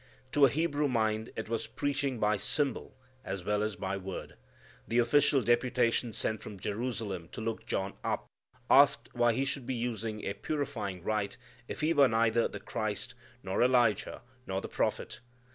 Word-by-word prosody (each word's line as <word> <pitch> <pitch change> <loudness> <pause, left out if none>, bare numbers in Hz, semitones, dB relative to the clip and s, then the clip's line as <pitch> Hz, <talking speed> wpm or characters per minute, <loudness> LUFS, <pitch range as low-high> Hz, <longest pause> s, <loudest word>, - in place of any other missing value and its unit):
To 145 -1 +6
a - - 0
Hebrew 150 +1 +1
mind 110 -3 0
it 110 - -4
was 115 0 -2
preaching 140 -2 -1
by 105 0 +3
symbol 140 +6 -1 0.3
as 95 -1 -4
well 105 +2 +1
as 105 -1 -1
by 95 +1 -3
word. 95 -1 -6 0.5
The 115 - 0
official 130 +2 +4
deputation 120 -1 +2
sent 110 0 -2
from 100 -2 -8
Jerusalem 105 -4 -3
to - - -6
look 110 0 -4
John 95 0 -1
up - - -1 0.4
asked - - +5
why 120 -1 +3
he 135 +4 0
should 135 -2 -3
be 130 - -1
using 115 -2 -3
a 100 - -1
purifying 100 - -3
rite 105 +3 -1 0.3
if - - -5
he 155 +2 +3
were 140 -3 +6
neither 115 0 +3
the 105 - -7
Christ, 110 +4 -3 0.3
nor 95 0 -1
Elijah, 120 -4 +3 0.2
nor 95 0 -1
the - - -6
prophet. - - -2
115 Hz, 170 wpm, -31 LUFS, 105-130 Hz, 0.5 s, To